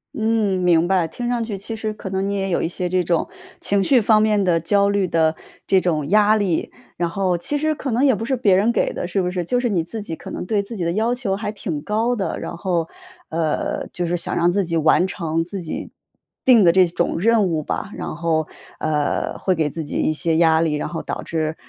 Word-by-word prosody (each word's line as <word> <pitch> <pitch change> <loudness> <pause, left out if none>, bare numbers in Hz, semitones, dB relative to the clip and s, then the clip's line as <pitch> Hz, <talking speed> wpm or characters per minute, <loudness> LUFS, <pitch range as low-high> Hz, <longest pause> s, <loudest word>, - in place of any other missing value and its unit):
嗯， 220 -4 +1
明 175 -1 +4
白。 185 -3 +2
听 240 +9 -5
上 240 -2 0
去 215 -3 -4
其 225 +3 -5
实 215 -1 -3
可 205 - -7
能 190 +1 -1
你 200 - -1
也 195 -1 -1
有 170 - 0
一 - - +1
些 180 +1 -3
这 185 0 +1
种 170 -1 0 0.3
情 200 -1 +2
绪 250 +5 +4
方 215 0 +4
面 210 -2 +2
的 175 -2 +2
焦 200 +5 +2
虑 200 -2 +1
的 160 -2 +2 0.3
这 190 - +4
种 155 -5 -1
压 210 +2 +5
力， 195 -6 -1 0.3
然 175 - 0
后 185 -1 0
其 290 - -2
实 310 +1 0
可 275 -3 -4
能 240 +4 +1
也 265 -4 +4
不 225 - -4
是 265 +2 0
别 210 -7 +3
人 210 +5 +3
给 - - 0
的， - - -4
是 190 +2 0
不 180 - -1
是？ 180 -1 -2
就 245 +8 +1
是 245 -1 0
你 180 -6 +1
自 220 +6 -6
己 165 -5 -5
可 - - -10
能 - - -4
对 205 -1 +1
自 230 +4 -8
己 185 - -3
的 170 0 0
要 225 +4 +1
求 240 -6 -1
还 205 +1 -3
挺 180 -7 -4
高 225 +4 0
的。 190 -7 -3
然 170 - -6
后， 170 -3 -1 0.4
呃， 160 -2 -1
就 175 -1 -2
是 175 +1 0
想 170 - -3
让 175 +1 +3
自 195 +1 +1
己 165 -1 -1
完 160 +3 +4
成 165 -4 -2
自 190 +2 -5
己 160 - -6 0.5
定 240 -5 +6
的 170 - +6
这 185 0 +5
种 170 0 -1
任 225 +2 +3
务 165 -4 0
吧。 195 +6 -4
然 - - -5
后， 160 -1 0 0.3
呃， 150 -2 -1
会 185 - +1
给 160 -4 0
自 160 +2 -5
己 145 - -4
一 - - +1
些 160 +1 0
压 160 -1 +4
力， 160 -2 +1
然 150 - -2
后 165 - -5
导 - - -4
致， 160 -1 -2
185 Hz, 270 characters per minute, -21 LUFS, 165-215 Hz, 0.5 s, 定